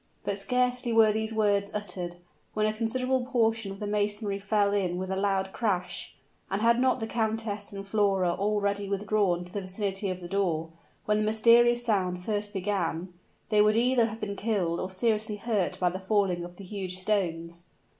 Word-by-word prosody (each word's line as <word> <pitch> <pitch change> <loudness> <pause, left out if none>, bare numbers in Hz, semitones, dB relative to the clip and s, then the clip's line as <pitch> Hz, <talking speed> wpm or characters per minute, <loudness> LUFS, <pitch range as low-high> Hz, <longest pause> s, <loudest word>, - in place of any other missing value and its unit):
But 200 0 -1
scarcely 250 +2 +1
were 225 -1 +6
these 220 +1 -2
words 205 -2 +2
uttered, 180 -4 -4 0.4
when 215 0 +2
a 215 - +1
considerable 255 +3 0
portion 225 -5 0
of 195 - -8
the 210 - -4
masonry 205 0 -1
fell 200 0 +1
in 185 -3 0
with 185 +1 -4
a - - 0
loud 195 -1 0
crash; 190 -6 -2 0.3
and 195 - -1
had 235 +2 +4
not 255 0 +2
the 225 - -2
countess 220 -2 -2
and 195 -1 -7
Flora 195 -3 +2
already 200 +1 -1
withdrawn 200 -3 +1
to 180 - -14
the 205 - -2
vicinity 195 +1 -3
of 185 0 -3
the 175 - -8
door, 170 -5 -1 0.3
when 210 0 +2
the - - +1
mysterious 235 +2 +4
sound 180 -4 0
first 205 -1 -2
began, 185 -3 -2 0.4
they 210 -2 +4
would 210 +1 +4
either 240 0 +3
have 220 0 -7
been 200 -2 -4
killed 195 -6 -1
or 185 - -3
seriously 215 +2 0
hurt 205 -3 -1
by 180 - +3
the 185 - -5
falling 190 -3 +1
of 175 0 -9
the 200 - -11
huge 185 -1 -5
stones. 175 -3 -2
205 Hz, 185 wpm, -28 LUFS, 190-220 Hz, 0.4 s, were